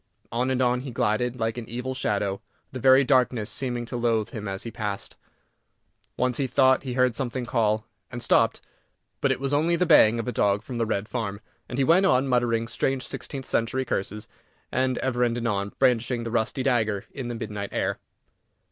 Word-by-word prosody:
On 125 Hz, +3 st, 0 dB
and 130 Hz, 0 st, +1 dB
on 125 Hz, 0 st, +1 dB
he 135 Hz, -, -6 dB
glided, 120 Hz, +2 st, 0 dB
like 115 Hz, +1 st, -1 dB
an 115 Hz, -, -9 dB
evil 125 Hz, +3 st, -4 dB
shadow, 100 Hz, -6 st, -1 dB, 0.3 s
the 130 Hz, -, -6 dB
very 130 Hz, +2 st, +6 dB
darkness 125 Hz, -4 st, +2 dB
seeming 120 Hz, -3 st, -2 dB
to 120 Hz, -, -6 dB
loathe 115 Hz, -2 st, 0 dB
him 105 Hz, -2 st, -6 dB
as 95 Hz, 0 st, -4 dB
he 115 Hz, -, -6 dB
passed. 105 Hz, -2 st, -5 dB, 1.0 s
Once 125 Hz, -1 st, 0 dB
he 135 Hz, -, 0 dB
thought 130 Hz, 0 st, +4 dB
he 130 Hz, -2 st, -5 dB
heard 125 Hz, -1 st, +3 dB
something 125 Hz, -1 st, -3 dB
call, 110 Hz, -3 st, +1 dB, 0.3 s
and 120 Hz, 0 st, -4 dB
stopped; -, -, +3 dB, 0.6 s
but -, -, +2 dB
it -, -, -1 dB
was 135 Hz, +1 st, -2 dB
only 160 Hz, +4 st, +3 dB
the 180 Hz, +2 st, +1 dB
baying 120 Hz, -9 st, +6 dB
of 115 Hz, -, -3 dB
a -, -, 0 dB
dog 100 Hz, -2 st, +1 dB
from 120 Hz, 0 st, -6 dB
the 115 Hz, -, +1 dB
Red 105 Hz, -1 st, -1 dB
Farm, 110 Hz, -5 st, -3 dB, 0.3 s
and 125 Hz, -, -5 dB
he 135 Hz, -, +3 dB
went 175 Hz, +7 st, +5 dB
on, 135 Hz, -5 st, +3 dB
muttering 120 Hz, -2 st, +1 dB
strange 135 Hz, +2 st, -1 dB
sixteenth 135 Hz, -2 st, -5 dB
century 130 Hz, +3 st, 0 dB
curses, 105 Hz, -2 st, -3 dB, 0.4 s
and 130 Hz, -1 st, +1 dB
ever 125 Hz, -2 st, -1 dB
and 120 Hz, -1 st, +1 dB
anon 100 Hz, -4 st, -1 dB
brandishing 125 Hz, -2 st, +2 dB
the 115 Hz, -, -4 dB
rusty 120 Hz, +3 st, 0 dB
dagger 110 Hz, -6 st, +1 dB
in 130 Hz, -3 st, -5 dB
the 120 Hz, -, -4 dB
midnight 105 Hz, -3 st, -5 dB
air. -, -, -1 dB
120 Hz, 200 wpm, -25 LUFS, 110-130 Hz, 1.0 s, very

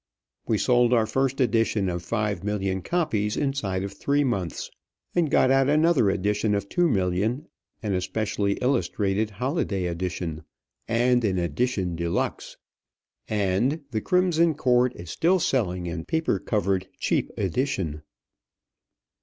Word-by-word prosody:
We 110 Hz, -, +2 dB
sold 120 Hz, +1 st, +3 dB
our 115 Hz, -2 st, +4 dB
first 135 Hz, +3 st, 0 dB
edition 115 Hz, -4 st, +2 dB
of 90 Hz, -1 st, -2 dB
five 105 Hz, 0 st, -2 dB
million 95 Hz, -2 st, -1 dB
copies 110 Hz, -, -1 dB
inside 110 Hz, -10 st, -1 dB
of 100 Hz, 0 st, -5 dB
three 145 Hz, +7 st, +1 dB
months, 100 Hz, -, -2 dB, 0.4 s
and 170 Hz, -4 st, +2 dB
got 130 Hz, -, +4 dB
out 135 Hz, 0 st, +4 dB
another 155 Hz, -7 st, +4 dB
edition 105 Hz, +2 st, 0 dB
of 100 Hz, 0 st, -2 dB
two 175 Hz, -, +2 dB
million, 105 Hz, -, 0 dB, 0.4 s
and 105 Hz, -2 st, -1 dB
a 90 Hz, -, 0 dB
specially 100 Hz, 0 st, -1 dB
illustrated 110 Hz, -5 st, 0 dB
holiday 110 Hz, -, -2 dB
edition, 85 Hz, -2 st, -3 dB, 0.4 s
and 120 Hz, +1 st, +2 dB
an 95 Hz, -4 st, +1 dB
"edition 90 Hz, -, -1 dB
de 85 Hz, 0 st, -2 dB
luxe;" 85 Hz, -, -2 dB, 0.7 s
and 105 Hz, -, +1 dB
"The 110 Hz, -2 st, -1 dB
Crimson 170 Hz, -, +2 dB
Cord" 125 Hz, -3 st, +2 dB
is 85 Hz, -1 st, -8 dB
still 180 Hz, +3 st, +3 dB
selling 90 Hz, -, 0 dB
in 85 Hz, -1 st, -4 dB
paper 160 Hz, -11 st, 0 dB
covered 95 Hz, -2 st, -1 dB
cheap -, -, 0 dB
edition. 95 Hz, -, -1 dB
105 Hz, 135 wpm, -25 LUFS, 95-130 Hz, 0.7 s, our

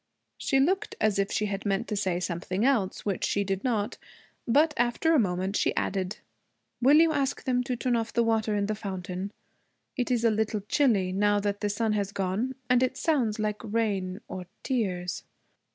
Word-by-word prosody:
She 270 Hz, -, +2 dB
looked 375 Hz, +9 st, +1 dB
as 210 Hz, -2 st, +2 dB
if 200 Hz, 0 st, 0 dB
she 215 Hz, -, 0 dB
had 200 Hz, -1 st, -3 dB
meant 205 Hz, +3 st, 0 dB
to 210 Hz, -, -1 dB
say 190 Hz, -4 st, 0 dB
something 180 Hz, +4 st, -2 dB
else, 225 Hz, -9 st, +1 dB
which 200 Hz, -3 st, -1 dB
she 200 Hz, -, +1 dB
did 195 Hz, 0 st, -2 dB
not. 220 Hz, -5 st, -1 dB, 0.5 s
But 295 Hz, +6 st, +4 dB
after 240 Hz, +7 st, +2 dB
a 310 Hz, -, +5 dB
moment 190 Hz, -1 st, 0 dB
she -, -, +1 dB
added, 190 Hz, 0 st, -1 dB, 0.6 s
'Will 275 Hz, +5 st, +6 dB
you 325 Hz, 0 st, +6 dB
ask 275 Hz, -2 st, -1 dB
them 250 Hz, -1 st, +1 dB
to 255 Hz, -1 st, -1 dB
turn 245 Hz, +1 st, 0 dB
off 230 Hz, -1 st, -1 dB
the 235 Hz, -, +2 dB
water 220 Hz, -2 st, +1 dB
in 200 Hz, -1 st, +1 dB
the 215 Hz, -, -1 dB
fountain? 190 Hz, -2 st, -5 dB, 0.6 s
It 250 Hz, -2 st, -1 dB
is 240 Hz, -2 st, +1 dB
a 230 Hz, -, +5 dB
little 215 Hz, -1 st, 0 dB
chilly, 210 Hz, -5 st, +2 dB
now 205 Hz, +2 st, +2 dB
that 205 Hz, 0 st, -1 dB
the 210 Hz, -, 0 dB
sun 215 Hz, +1 st, 0 dB
has 200 Hz, -2 st, -1 dB
gone, 200 Hz, +7 st, -1 dB
and 250 Hz, 0 st, +4 dB
it 255 Hz, -, +1 dB
sounds 255 Hz, -10 st, +1 dB
like 210 Hz, -1 st, -2 dB
rain 205 Hz, -3 st, -1 dB
or 180 Hz, -1 st, -7 dB, 0.2 s
tears.' 185 Hz, -, -2 dB
210 Hz, 195 wpm, -28 LUFS, 195-245 Hz, 0.6 s, Will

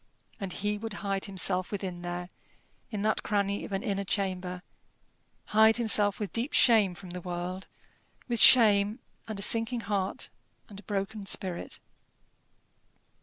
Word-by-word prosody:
And 195 Hz, -3 st, -4 dB
he 205 Hz, +3 st, -2 dB
would 225 Hz, 0 st, -5 dB
hide 195 Hz, -1 st, -1 dB
himself 185 Hz, -2 st, +1 dB
within 185 Hz, -3 st, -5 dB
there, 175 Hz, 0 st, -5 dB, 0.6 s
in 210 Hz, -4 st, -4 dB
that 215 Hz, -, +1 dB
cranny 200 Hz, -1 st, -1 dB
of -, -, -10 dB
an 195 Hz, -, -2 dB
inner 200 Hz, -4 st, -2 dB
chamber 185 Hz, -2 st, -3 dB, 0.8 s
hide 220 Hz, +1 st, +5 dB
himself 210 Hz, -3 st, +2 dB
with 205 Hz, -3 st, -4 dB
deep 235 Hz, +5 st, -2 dB
shame 215 Hz, -7 st, +4 dB
from 185 Hz, -1 st, -10 dB
the 180 Hz, 0 st, -6 dB
world, 180 Hz, +1 st, -5 dB, 0.6 s
with 240 Hz, -2 st, 0 dB
shame, 210 Hz, -3 st, +6 dB, 0.3 s
and 215 Hz, -2 st, -5 dB
a -, -, 0 dB
sinking 230 Hz, +3 st, +2 dB
heart, 200 Hz, -3 st, -2 dB, 0.4 s
and 200 Hz, -3 st, -11 dB
a -, -, -14 dB
broken 200 Hz, 0 st, -4 dB
spirit. 185 Hz, -3 st, -3 dB
200 Hz, 145 wpm, -29 LUFS, 185-215 Hz, 0.8 s, shame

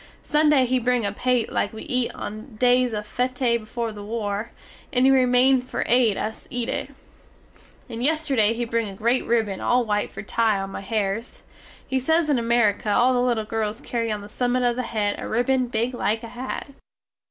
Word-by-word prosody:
Sunday 300 Hz, -3 st, +3 dB
he 255 Hz, +1 st, +1 dB
bring 245 Hz, -1 st, +1 dB
a 200 Hz, -, 0 dB
paté 245 Hz, +2 st, 0 dB
like -, -, 0 dB
we 220 Hz, -, -8 dB
eat 250 Hz, -1 st, 0 dB
on 215 Hz, +3 st, -7 dB
days 250 Hz, +1 st, +3 dB
of 210 Hz, -1 st, -4 dB
féte 250 Hz, +1 st, 0 dB
before 225 Hz, +1 st, -4 dB
the 210 Hz, -1 st, -9 dB
war; 210 Hz, 0 st, -3 dB, 0.4 s
and 255 Hz, -1 st, +3 dB
he 270 Hz, -, +6 dB
remain 255 Hz, 0 st, +4 dB
for 255 Hz, -, -3 dB
aid 235 Hz, -3 st, +3 dB
us 220 Hz, +1 st, -5 dB
eat 245 Hz, -1 st, -3 dB
it. -, -, -3 dB, 1.0 s
And 230 Hz, +1 st, -5 dB
yesterday 275 Hz, -7 st, +2 dB
he 240 Hz, +1 st, -2 dB
bring 230 Hz, -2 st, -1 dB
a 195 Hz, -, -9 dB
great 235 Hz, +5 st, +1 dB
ribbon 220 Hz, -5 st, 0 dB
all 245 Hz, 0 st, +2 dB
white 210 Hz, -1 st, 0 dB
for -, -, -8 dB
tie 220 Hz, 0 st, +1 dB
on 195 Hz, 0 st, -5 dB
my -, -, -6 dB
hairs. 205 Hz, +2 st, -3 dB, 0.4 s
He 265 Hz, -, 0 dB
say 320 Hz, +6 st, +2 dB
in 300 Hz, -6 st, +1 dB
Amerique 230 Hz, -3 st, +1 dB
all 240 Hz, +5 st, +4 dB
the 245 Hz, -, +2 dB
little 240 Hz, -3 st, +1 dB
girls 215 Hz, -1 st, -2 dB
carry 230 Hz, -2 st, -2 dB
on 210 Hz, -1 st, -3 dB
the 205 Hz, -, -9 dB
summit 245 Hz, +3 st, 0 dB
of 240 Hz, -1 st, +2 dB
the 255 Hz, -, -1 dB
head 215 Hz, -4 st, -2 dB
a -, -, -5 dB
ribbon 250 Hz, +2 st, +1 dB
big 235 Hz, +2 st, -1 dB
like 225 Hz, -2 st, -1 dB
a 230 Hz, -, -7 dB
hat. 250 Hz, +4 st, -6 dB
235 Hz, 200 wpm, -24 LUFS, 215-250 Hz, 1.0 s, he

